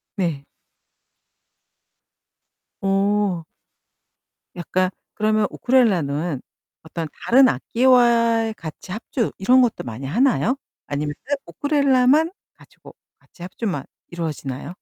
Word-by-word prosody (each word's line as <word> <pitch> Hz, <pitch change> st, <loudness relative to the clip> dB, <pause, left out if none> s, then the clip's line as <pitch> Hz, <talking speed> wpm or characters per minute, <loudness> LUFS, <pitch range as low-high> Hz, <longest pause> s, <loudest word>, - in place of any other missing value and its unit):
네. 165 Hz, -8 st, -2 dB, 2.4 s
어. 195 Hz, -2 st, +1 dB, 1.1 s
약간 185 Hz, +1 st, 0 dB, 0.3 s
그러면 215 Hz, -1 st, +2 dB
우크렐레는 175 Hz, -, +1 dB, 0.4 s
어떤 160 Hz, 0 st, -5 dB, 0.2 s
다른 260 Hz, +2 st, +6 dB
악기와 235 Hz, -3 st, +3 dB
같이 160 Hz, +2 st, -9 dB
합주 225 Hz, +3 st, -2 dB
이런 250 Hz, +7 st, +5 dB
것도 240 Hz, -3 st, 0 dB
많이 120 Hz, +3 st, -7 dB
하나요? 245 Hz, -, +2 dB, 0.3 s
아니면 145 Hz, +1 st, -2 dB
쎄 285 Hz, -, +1 dB
우크렐레만 280 Hz, -, +2 dB, 0.3 s
가지고 -, -, -17 dB, 0.2 s
같이 -, -, -22 dB
합주만 180 Hz, -, -4 dB, 0.2 s
이루어지나요? 155 Hz, -4 st, -5 dB
205 Hz, 225 characters per minute, -22 LUFS, 165-245 Hz, 2.4 s, 다른